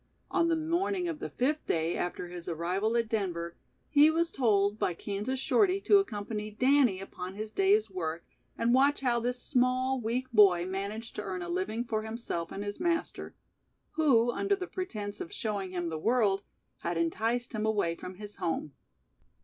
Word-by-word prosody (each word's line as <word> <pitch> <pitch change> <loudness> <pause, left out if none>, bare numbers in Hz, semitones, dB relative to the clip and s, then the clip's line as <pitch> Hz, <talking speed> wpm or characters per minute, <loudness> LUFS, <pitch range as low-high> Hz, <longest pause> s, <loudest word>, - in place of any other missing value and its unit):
On 335 -3 +3
the 335 - +3
morning 345 +3 0
of 325 -3 -4
the - - -4
fifth 295 +5 -1
day 165 +1 +1
after 175 0 -3
his 175 -1 -7
arrival 185 +7 0
at 230 -1 +1
Denver, 175 -6 -2 0.3
he 300 +1 +6
was 330 +1 +1
told 210 -4 +2
by 175 - 0
Kansas 210 +9 -3
Shorty 390 - +3
to 405 0 +6
accompany 210 - -3
Danny 255 -2 +3
upon 185 -1 -7
his 215 +1 -5
day's 395 - +3
work 165 -1 -4 0.3
and 235 +1 +2
watch 275 +3 +4
how 245 -3 +2
this 245 +1 -2
small, 255 0 +1
weak 235 +3 -1
boy 195 -6 +6
managed 200 +4 -4
to - - -1
earn 185 -3 -4
a 175 - -6
living 190 +7 -1
for 220 -3 -2
himself 220 -7 -4
and 200 - -4
his 205 0 -5
master, 340 -1 -2 0.6
who 245 -7 +3
under 400 +10 +1
the 375 -2 -5
pretense 215 - -5
of - - -6
"showing 205 -4 -3
him 175 -2 -3
the 160 -1 -4
world", 210 -1 +2 0.4
had 170 0 -2
enticed 225 +10 0
him 215 0 -1
away 205 -6 +1
from 180 +2 -8
his 210 +1 -9
home. 155 -3 -2
220 Hz, 180 wpm, -30 LUFS, 185-265 Hz, 0.6 s, he